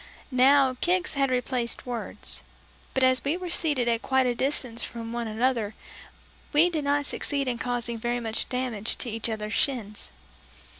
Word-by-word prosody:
Now 260 Hz, 0 st, +5 dB
kicks 360 Hz, +1 st, +2 dB
had 275 Hz, -2 st, +2 dB
replaced 250 Hz, -1 st, -1 dB
words; 245 Hz, -2 st, -4 dB, 0.5 s
but 265 Hz, -, +3 dB
as 255 Hz, -2 st, +4 dB
we 290 Hz, +5 st, +1 dB
were 360 Hz, -1 st, -5 dB
seated 290 Hz, -8 st, +2 dB
at 230 Hz, -1 st, +2 dB
quite 265 Hz, -1 st, +2 dB
a 245 Hz, -, +2 dB
distance 250 Hz, -2 st, 0 dB
from 230 Hz, -1 st, -6 dB
one 235 Hz, -1 st, -2 dB
another, 220 Hz, -1 st, 0 dB, 0.8 s
we 325 Hz, +4 st, +6 dB
did 310 Hz, -4 st, -2 dB
not 285 Hz, 0 st, +2 dB
succeed 280 Hz, -1 st, -1 dB
in 240 Hz, -2 st, -1 dB
causing 240 Hz, -1 st, -2 dB
very 240 Hz, +2 st, -1 dB
great 225 Hz, -1 st, -1 dB
damage 250 Hz, -4 st, -2 dB
to 240 Hz, -, -3 dB
each 225 Hz, +1 st, -2 dB
other's 215 Hz, -1 st, -3 dB
shins. 225 Hz, -, 0 dB
250 Hz, 165 wpm, -27 LUFS, 230-275 Hz, 0.8 s, we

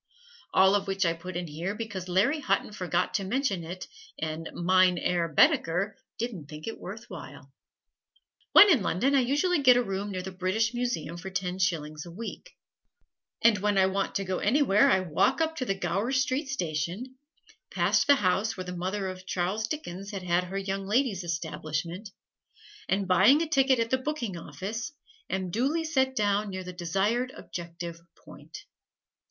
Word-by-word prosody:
All 190 Hz, +1 st, +5 dB
of 200 Hz, -1 st, +1 dB
which 195 Hz, -1 st, 0 dB
I 165 Hz, -, +2 dB
put 175 Hz, +1 st, -7 dB
in 175 Hz, -, -3 dB
here 170 Hz, +6 st, -4 dB
because 205 Hz, -5 st, -5 dB
Larry 220 Hz, -, +2 dB
Hutton 200 Hz, -7 st, 0 dB
forgot 185 Hz, -4 st, -1 dB
to 200 Hz, -, 0 dB
mention 200 Hz, -3 st, -1 dB
it 180 Hz, +3 st, -7 dB, 0.3 s
and 160 Hz, 0 st, -4 dB
Mein 185 Hz, +1 st, +3 dB
Herr 170 Hz, 0 st, 0 dB
Baedeker 180 Hz, +6 st, +3 dB, 0.2 s
didn't 205 Hz, -11 st, -5 dB
think 150 Hz, 0 st, -8 dB
it 225 Hz, -, -5 dB
worth 215 Hz, +4 st, -8 dB
while. 135 Hz, 0 st, -10 dB, 1.0 s
When 415 Hz, -, +10 dB
in 275 Hz, -10 st, +4 dB
London 225 Hz, +10 st, +1 dB
I 275 Hz, -, +5 dB
usually 290 Hz, +7 st, +2 dB
get 250 Hz, -2 st, +7 dB
a 245 Hz, -, +2 dB
room 195 Hz, -1 st, -3 dB
near 185 Hz, -1 st, -4 dB
the 190 Hz, -, -6 dB
British 190 Hz, +5 st, 0 dB
Museum 240 Hz, -10 st, -2 dB
for 185 Hz, +2 st, -7 dB
ten 185 Hz, -1 st, -3 dB
shillings 155 Hz, -4 st, -1 dB
a -, -, -9 dB
week; 230 Hz, -, -7 dB, 0.9 s
and 230 Hz, -4 st, +5 dB
when 205 Hz, 0 st, +1 dB
I 190 Hz, -, +5 dB
want 195 Hz, +1 st, -1 dB
to 195 Hz, -, 0 dB
go 185 Hz, -1 st, -2 dB
anywhere 220 Hz, -3 st, +4 dB
I 190 Hz, -, +4 dB
walk 185 Hz, -, +1 dB
up 320 Hz, 0 st, 0 dB
to 255 Hz, -, -2 dB
the 195 Hz, -, 0 dB
Gower 200 Hz, +5 st, -1 dB
Street 265 Hz, +2 st, 0 dB
Station, 185 Hz, -, -3 dB, 0.5 s
past -, -, +2 dB
the 285 Hz, -, +7 dB
house 205 Hz, -1 st, +1 dB
where 185 Hz, -, -4 dB
the 180 Hz, 0 st, -5 dB
mother 190 Hz, +3 st, -2 dB
of 185 Hz, 0 st, -8 dB
Charles 190 Hz, +5 st, -1 dB
Dickens 200 Hz, -, -5 dB
had 195 Hz, -3 st, -5 dB, 0.2 s
her 190 Hz, +2 st, -5 dB
Young 195 Hz, 0 st, -3 dB
Ladies' 215 Hz, -4 st, +1 dB
Establishment, 170 Hz, +3 st, -4 dB, 0.8 s
and 195 Hz, 0 st, +1 dB
buying 210 Hz, -, +5 dB
a -, -, -3 dB
ticket 270 Hz, -3 st, +3 dB
at 230 Hz, 0 st, -1 dB
the 260 Hz, -, +2 dB
"Booking 260 Hz, -8 st, -3 dB
Office" 215 Hz, -, -5 dB, 0.4 s
am 185 Hz, -1 st, -2 dB
duly 275 Hz, -, 0 dB
set 265 Hz, -4 st, +1 dB
down 205 Hz, -2 st, +1 dB
near 185 Hz, -1 st, -5 dB
the 180 Hz, 0 st, -7 dB
desired 195 Hz, +9 st, 0 dB
objective 170 Hz, -1 st, -7 dB, 0.3 s
point. -, -, -11 dB
195 Hz, 175 wpm, -28 LUFS, 180-235 Hz, 1.0 s, When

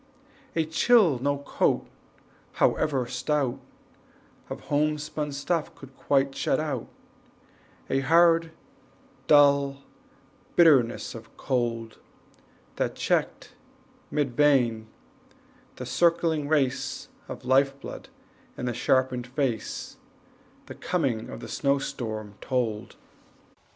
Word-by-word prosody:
A 165 Hz, -1 st, +1 dB
chill 165 Hz, -, +4 dB
no 140 Hz, +2 st, 0 dB
coat, 140 Hz, -, 0 dB, 0.7 s
however 140 Hz, -5 st, +1 dB
stout, 130 Hz, +1 st, -1 dB, 0.9 s
Of -, -, -6 dB
homespun 150 Hz, 0 st, -1 dB
stuff 150 Hz, +3 st, -2 dB
could 135 Hz, -1 st, -14 dB
quite, 135 Hz, -1 st, +1 dB
shut -, -, 0 dB
out, 145 Hz, -6 st, -3 dB, 1.0 s
A 135 Hz, -, +1 dB
hard, 165 Hz, +3 st, +4 dB, 0.8 s
dull 140 Hz, -2 st, +4 dB, 0.7 s
bitterness 140 Hz, -9 st, +4 dB
of 115 Hz, -, -12 dB
cold, 115 Hz, -3 st, -2 dB, 0.8 s
That -, -, -1 dB
checked, -, -, -1 dB, 0.6 s
mid 140 Hz, -5 st, -1 dB
vein, 120 Hz, -7 st, +3 dB, 0.9 s
the -, -, -7 dB
circling 165 Hz, -3 st, +1 dB
race 145 Hz, -4 st, -1 dB, 0.2 s
Of -, -, -8 dB
life 135 Hz, +1 st, +3 dB
blood -, -, -9 dB, 0.5 s
in 125 Hz, -, -4 dB
the 120 Hz, -, -1 dB
sharpened 125 Hz, +1 st, +1 dB
face, 125 Hz, -3 st, -3 dB, 0.7 s
The -, -, -9 dB
coming 135 Hz, -11 st, -2 dB
of -, -, -8 dB
the -, -, -7 dB
snow 140 Hz, +5 st, +1 dB
storm 110 Hz, -6 st, -5 dB
told. 120 Hz, -5 st, -2 dB
140 Hz, 100 wpm, -26 LUFS, 125-150 Hz, 1.0 s, chill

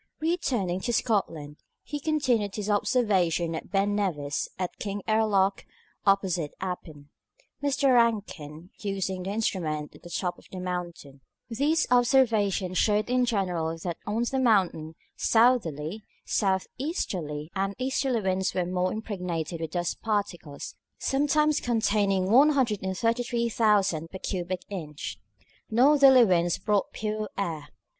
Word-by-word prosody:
Returning 250 Hz, -, 0 dB
to 240 Hz, +5 st, -2 dB
Scotland, 165 Hz, -11 st, -1 dB, 0.3 s
he 295 Hz, -, -5 dB
continued 260 Hz, -10 st, 0 dB
his 210 Hz, 0 st, -2 dB
observations 185 Hz, -7 st, +1 dB
at -, -, -7 dB
Ben 200 Hz, 0 st, +1 dB
Nevis 150 Hz, -9 st, -1 dB
and 185 Hz, -1 st, -2 dB
at -, -, -34 dB
Kingairloch, 200 Hz, -1 st, +1 dB, 0.4 s
opposite 185 Hz, -6 st, +1 dB
Appin, 160 Hz, -6 st, -6 dB, 0.5 s
Mr. 280 Hz, -2 st, +2 dB
Rankin 195 Hz, -9 st, 0 dB
using 195 Hz, -2 st, -2 dB
the 185 Hz, -, -4 dB
instrument 170 Hz, -8 st, -2 dB
at -, -, -16 dB
the 175 Hz, -, -11 dB
top 175 Hz, +1 st, -3 dB
of -, -, -19 dB
the 185 Hz, -, -6 dB
mountain. 175 Hz, -6 st, -5 dB, 0.3 s
These 300 Hz, +7 st, +2 dB
observations 225 Hz, -7 st, +3 dB
showed 210 Hz, +2 st, +2 dB
in 250 Hz, 0 st, +3 dB
general 180 Hz, -7 st, -1 dB
that 175 Hz, -2 st, -3 dB
on 220 Hz, +3 st, 0 dB
the 265 Hz, +2 st, -1 dB
mountain 185 Hz, -10 st, +2 dB, 0.2 s
southerly, 215 Hz, -, +2 dB, 0.2 s
south 190 Hz, -3 st, +1 dB
easterly, 170 Hz, -, -3 dB
and 195 Hz, 0 st, -1 dB
easterly 260 Hz, -2 st, 0 dB
winds 190 Hz, -1 st, 0 dB
were 180 Hz, -, +1 dB
more 180 Hz, +1 st, 0 dB
impregnated 180 Hz, -6 st, -4 dB
with 160 Hz, -, -3 dB
dust 175 Hz, +1 st, -3 dB
particles, 185 Hz, -9 st, -3 dB, 0.2 s
sometimes 295 Hz, +2 st, +2 dB
containing 205 Hz, -5 st, +1 dB
133,000 230 Hz, -, +2 dB
per 190 Hz, -, -7 dB
cubic 185 Hz, -1 st, -3 dB
inch. 155 Hz, -7 st, -6 dB, 0.5 s
Northerly 265 Hz, +1 st, +6 dB
winds 175 Hz, -3 st, +2 dB
brought 210 Hz, -2 st, 0 dB
pure 215 Hz, 0 st, -3 dB
air. 165 Hz, -7 st, -3 dB
200 Hz, 125 wpm, -27 LUFS, 175-235 Hz, 0.5 s, Northerly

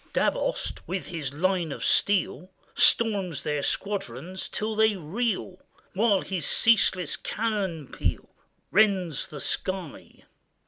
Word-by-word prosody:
Davoust, -, -, 0 dB
with 190 Hz, 0 st, -3 dB
his 155 Hz, -6 st, -4 dB
line 175 Hz, +1 st, 0 dB
of -, -, -4 dB
steel, 190 Hz, -2 st, +1 dB, 0.2 s
Storms 195 Hz, -, +3 dB
their 150 Hz, -1 st, -1 dB
squadrons 185 Hz, -, -3 dB
till 215 Hz, +1 st, -2 dB
they 220 Hz, -1 st, +4 dB
reel, 190 Hz, +2 st, -2 dB, 0.3 s
While 205 Hz, 0 st, +3 dB
his 180 Hz, -6 st, -3 dB
ceaseless 185 Hz, -7 st, +3 dB
cannon 200 Hz, -8 st, -2 dB
peal -, -, -3 dB, 0.4 s
Rends 190 Hz, -7 st, +2 dB
the 150 Hz, -, -8 dB
sky. 185 Hz, +1 st, -4 dB
185 Hz, 110 wpm, -27 LUFS, 165-210 Hz, 0.4 s, they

